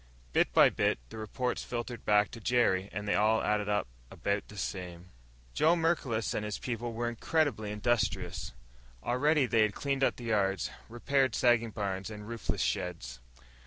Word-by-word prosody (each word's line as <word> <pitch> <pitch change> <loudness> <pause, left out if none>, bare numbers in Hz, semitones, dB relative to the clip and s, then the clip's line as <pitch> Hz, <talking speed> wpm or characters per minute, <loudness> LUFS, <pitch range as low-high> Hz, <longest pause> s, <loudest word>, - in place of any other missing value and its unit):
Bit - - +3
by - - +6
bit - - +1
the - - -8
reports 125 +4 -2
filtered 120 -1 -5
back 105 -1 +4
to 115 - -8
Jerry, 105 -5 +2
and 105 +2 -5
they - - +2
all 110 +2 +3
added 105 -1 0
up 105 -7 +1 0.2
about 100 0 -2
the 105 - -12
same. 90 -2 -5 0.4
Joe 160 +3 +4
Merklos 160 -9 0
and 105 - -2
his 105 -1 -3
people 120 -1 -4
were 120 +1 -2
incredibly 120 -2 0
industrious. 115 +2 -1 0.5
Already 145 - +2
they 115 -2 +2
had 110 -1 +2
cleaned 140 -1 -1
up - - +3
the 120 - -10
yards, 100 -5 0 0.2
repaired 130 +1 +1
sagging 120 -2 +3
barns 100 -1 -3
and 105 -1 -8
roofless 115 - -3
sheds. 65 0 -2
110 Hz, 165 wpm, -31 LUFS, 100-120 Hz, 0.5 s, by